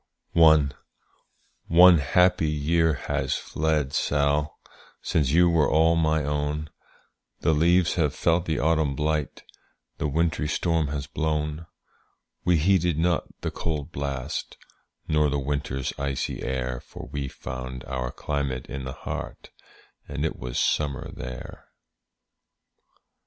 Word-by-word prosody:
One 80 +2 +3
happy 80 +3 +3
year 80 +2 +2
has 65 - -2
fled, 75 -3 -1
Sall, 75 +1 0 0.4
Since 75 -5 +1
you 85 +4 +5
were 80 -4 +3
all 80 +1 +4
my 80 -1 +2
own, 75 +1 -2 0.7
The 80 - +3
leaves 85 +3 +3
have 75 -5 0
felt 85 +1 +1
the 80 -2 -1
autumn 80 -3 +1
blight, 75 0 -2 0.6
The 75 - 0
wintry 80 +1 0
storm 80 0 0
has 70 0 -3
blown. 75 +2 -2 0.8
We 90 -1 +3
heeded 90 -1 +2
not 85 +1 +1 0.2
the - - -2
cold 75 -2 -3
blast, 70 -1 -4 0.5
Nor 75 -1 +2
the 70 - 0
winter's 70 -1 -2
icy 70 -1 -2
air; 65 -1 -2
For - - -11
we 70 -2 -3
found 65 0 -7
our 65 -2 -3
climate 70 -4 -3
in 70 -1 -6
the 65 - -5
heart, - - -7 0.6
And 70 +2 -3
it 80 - -2
was - - -5
summer 75 0 0
there. 65 0 -8 1.2
II. - - -46
75 Hz, 125 wpm, -25 LUFS, 70-80 Hz, 1.2 s, you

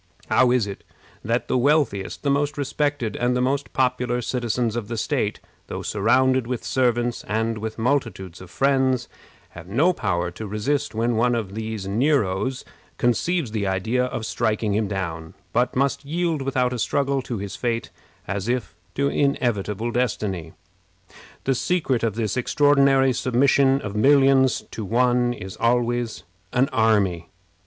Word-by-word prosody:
How 125 - +5
is 125 -3 +2
it 100 -1 -7 0.4
that 115 +3 -1
the 130 - +1
wealthiest, 130 -8 +1
the 140 - +2
most 145 +1 0
respected, 145 -4 -1
and 125 +1 +1
the - - 0
most 135 +3 0
popular 125 -1 0
citizens 120 -1 -1
of 115 -3 -3
the 115 0 -4
state, - - -1 0.3
though - - -5
surrounded 130 +4 +2
with 125 -1 -3
servants 120 -2 0
and 110 +1 -1
with 110 0 -5
multitudes 115 -8 -2
of 95 - -11
friends, 130 0 +1 0.4
have 85 +1 -11
no 145 - +3
power 90 - -1
to 105 +5 -7
resist 110 +4 -1
when 115 +1 0
one 120 +1 +2
of 105 -4 -3
these 110 -2 -4
Neros 125 +1 0 0.3
conceives 130 +3 0
the 105 -3 -1
idea 110 +7 0
of 120 -3 -4
striking 110 -1 0
him 105 0 +1
down, 85 -5 -4 0.2
but 125 +2 +1
must 140 +2 0
yield 165 +1 -1
without 130 -2 0
a 125 - -4
struggle 140 +3 0
to 125 -2 -5
his 100 -2 -5
fate, 115 -2 -2 0.4
as 100 +3 -3
if 125 0 -1 0.2
to 140 +1 +1
inevitable 120 -6 0
destiny? 105 -9 -2 0.9
The 135 - +1
secret 140 -3 0
of 115 -3 -1
this 110 -2 -1
extraordinary 135 0 +3
submission 135 +2 +3
of 105 -1 -5
millions 135 +2 +4
to 110 - -5
one 120 +3 +2
is 95 -5 -7
always 120 0 0 0.3
an 130 +3 +2
army. 100 -7 +2
120 Hz, 155 wpm, -23 LUFS, 110-135 Hz, 0.9 s, How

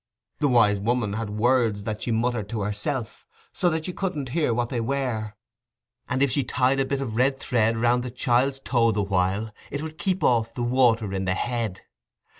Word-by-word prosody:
The 145 - +2
Wise 110 -6 +4
Woman 115 -1 0
had 110 0 -3
words 110 -1 +1
that 110 0 -4
she - - -3
muttered 115 -2 0
to 110 -2 -3
herself, 110 +4 -3 0.3
so 180 - +2
that 160 0 -2
you 180 - -4
couldn't 175 -10 -3
hear 150 -1 +1
what 120 +1 0
they 120 -3 -2
were, 115 -4 -2 0.7
and 130 +2 +1
if 140 - +2
she 140 +2 +1
tied 130 +2 +1
a 135 - +2
bit 140 0 -2
of 115 -5 -4
red 130 +3 +2
thread 115 -3 +1
round 120 +2 +2
the 125 - -4
child's 130 +2 +1
toe 115 -1 +2
the 105 -1 0
while, 100 +3 0 0.2
it 145 +2 -4
would 160 +1 -7
keep 185 +1 -1
off 115 -2 +2
the 120 - -2
water 120 -4 +2
in 95 0 -2
the 95 0 +1
head. 115 -4 -2
120 Hz, 205 wpm, -25 LUFS, 110-135 Hz, 0.7 s, Wise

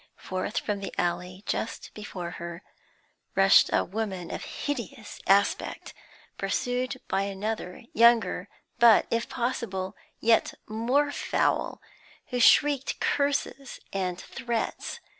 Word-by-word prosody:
Forth 185 +3 -4
from 205 -2 -1
the 195 - -5
alley, 180 +2 -2
just 225 - -3
before 185 -5 -6
her, 170 +1 -6 0.7
rushed 195 0 +6
a - - +3
woman 190 -3 -4
of - - -5
hideous 270 -5 -5
aspect, 200 +1 +2 0.5
pursued 250 +1 -1
by 190 +1 +1
another, 200 -1 -4
younger, 235 0 +4 0.3
but, 235 -3 +7
if 230 0 0
possible, 215 -6 -2 0.2
yet 225 0 +3
more 250 +7 +1
foul, - - 0 0.5
who 250 - -1
shrieked 285 +2 +4
curses 280 -1 -1
and 185 -2 -1
threats. 240 0 -3
220 Hz, 110 wpm, -27 LUFS, 190-245 Hz, 0.7 s, but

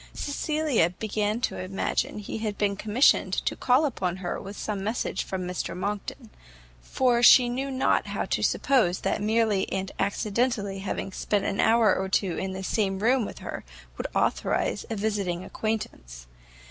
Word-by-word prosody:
Cecilia 295 - 0
began 210 +3 -2
to - - -2
imagine 190 +3 -2
he 210 +1 -5
had 215 -2 -3
been 200 -1 +1
commissioned 215 +6 +3
to - - 0
call 260 +5 +3
upon 185 -10 -2
her 180 -2 -4
with 200 +1 -8
some 205 -3 -3
message 220 +4 -2
from 190 -1 -4
Mr 180 0 -4
Monckton: 210 +4 -4 0.5
for 240 - +1
she 245 +1 +8
knew 260 +3 -2
not 260 0 +1
how - - -2
to - - -1
suppose 225 -10 +2
that - - -1
merely 215 -2 +1
and 190 0 -2
accidentally 200 0 0
having 195 0 -4
spent 200 +1 -1
an 200 - -2
hour 225 -1 +4
or 190 0 -2
two 190 -2 +1
in 190 0 -3
the 190 0 -5
same 195 0 0
room 235 +3 +2
with - - -8
her, - - -5 0.3
would - - -4
authorize - - 0
a 225 - -2
visiting 200 -4 -1
acquaintance. 125 - -4
210 Hz, 165 wpm, -26 LUFS, 190-235 Hz, 0.5 s, she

